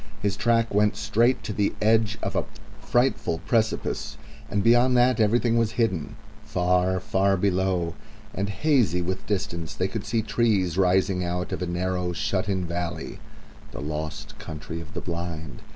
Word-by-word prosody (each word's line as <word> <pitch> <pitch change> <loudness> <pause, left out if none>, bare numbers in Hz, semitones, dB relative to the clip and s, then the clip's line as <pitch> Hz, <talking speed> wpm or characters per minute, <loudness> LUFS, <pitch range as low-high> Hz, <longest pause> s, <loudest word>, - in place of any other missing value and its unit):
His 100 -1 0
track 115 +1 +2
went 105 +1 +3
straight 115 +4 +2
to 110 - -4
the 100 0 +1
edge 110 0 +3
of - - -2
a - - +1 0.3
frightful 120 -5 +1
precipice, 110 -2 0 0.3
and 100 -1 0
beyond 120 +3 +5
that 125 0 +4
everything 115 +2 +3
was 115 -1 +1
hidden. 100 -10 -1 0.3
Far, 90 -2 +1
far 95 +1 +1
below, 90 -2 +1 0.4
and 100 +1 -2
hazy 105 - +2
with 95 +2 -3
distance, 85 -5 -2
they 95 - 0
could 100 +2 -4
see 110 0 0
trees 105 -7 +1
rising 95 0 +2
out 90 +1 -2
of - - -3
a 90 - -1
narrow, 90 0 -1
shut 95 +3 -1
in 95 -2 0
valley 85 -2 -4 0.5
the - - -6
lost 75 +1 -5
Country 80 +2 -6
of 75 -3 -11
the - - -3
Blind. 85 -5 -5
95 Hz, 160 wpm, -25 LUFS, 90-110 Hz, 0.5 s, beyond